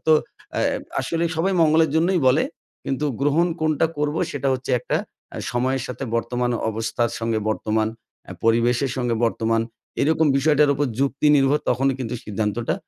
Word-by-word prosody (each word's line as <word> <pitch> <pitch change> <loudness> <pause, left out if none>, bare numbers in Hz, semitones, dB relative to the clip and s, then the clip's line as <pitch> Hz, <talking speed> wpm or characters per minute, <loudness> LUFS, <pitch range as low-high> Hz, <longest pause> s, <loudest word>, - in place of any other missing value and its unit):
তো 160 - +6 0.5
এ - - +2 0.4
আসলে 165 0 -1
সবাই 190 +4 +1
মঙ্গলের 160 -1 +4
জন্যই 170 +3 +2
বলে 130 +5 +4 0.4
কিন্তু 135 +2 -2 0.2
গ্রহণ 145 +5 +3
কোনটা 155 0 +2
করব? 150 +1 0
সেটা 140 -1 -2
হচ্ছে 130 +1 -5
একটা - - -1 0.4
আ - - -6
সময়ের 130 +2 0
সাথে 125 +2 -5
বর্তমান 120 +1 -1 0.2
অবস্থার 115 +2 -1
সঙ্গে 115 -1 -1
বর্তমান 110 0 0 0.4
এ - - -4
পরিবেশের 120 +3 +2
সঙ্গে 120 -2 0
বর্তমান 115 0 +1 0.4
এরকম 160 +2 +3
বিষয়টার 150 +1 +4
উপর 145 +1 0
যুক্তি 140 +2 +1
নির্ভর 135 +2 +3
তখনই 135 +2 +2
কিন্তু 125 -1 -3
সিদ্ধান্তটা 105 +2 -1
135 Hz, 155 wpm, -22 LUFS, 115-150 Hz, 0.5 s, তো